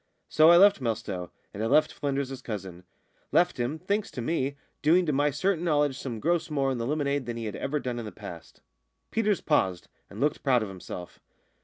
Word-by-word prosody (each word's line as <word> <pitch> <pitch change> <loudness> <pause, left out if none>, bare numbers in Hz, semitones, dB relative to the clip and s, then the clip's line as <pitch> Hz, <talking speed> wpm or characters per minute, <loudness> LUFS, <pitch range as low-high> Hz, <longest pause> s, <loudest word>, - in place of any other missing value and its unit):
So 155 +1 +6
I 170 - +8
left 200 -3 +6
Melstowe, 110 -7 -3 0.2
and 100 - -5
I - - +1
left 150 +5 +3
Flynders's 135 -2 -3
cousin 95 -5 -7 0.5
left 175 -2 +3
him, 120 +6 -1
thanks 200 +5 -1
to 125 - -6
me, 140 -1 -1 0.2
doing 175 +4 +4
to 150 - 0
my 145 +2 +3
certain 170 +4 0
knowledge 145 -4 +2
some 120 -5 -5
gross 170 +6 0
more 140 -3 0
in 130 - -2
the 115 - -2
lemonade 145 -3 -1
than 120 -1 -4
he 115 - -4
had 105 - -4
ever 150 +2 -2
done 125 -3 -3
in 115 - -5
the 105 - -6
past." 85 -6 -11 0.5
Peters 215 -3 +1
paused, 95 - 0 0.2
and 100 - -10
looked 150 +3 0
proud 125 -5 +3
of 105 - -5
himself. 90 -1 -9
140 Hz, 205 wpm, -27 LUFS, 115-155 Hz, 0.5 s, I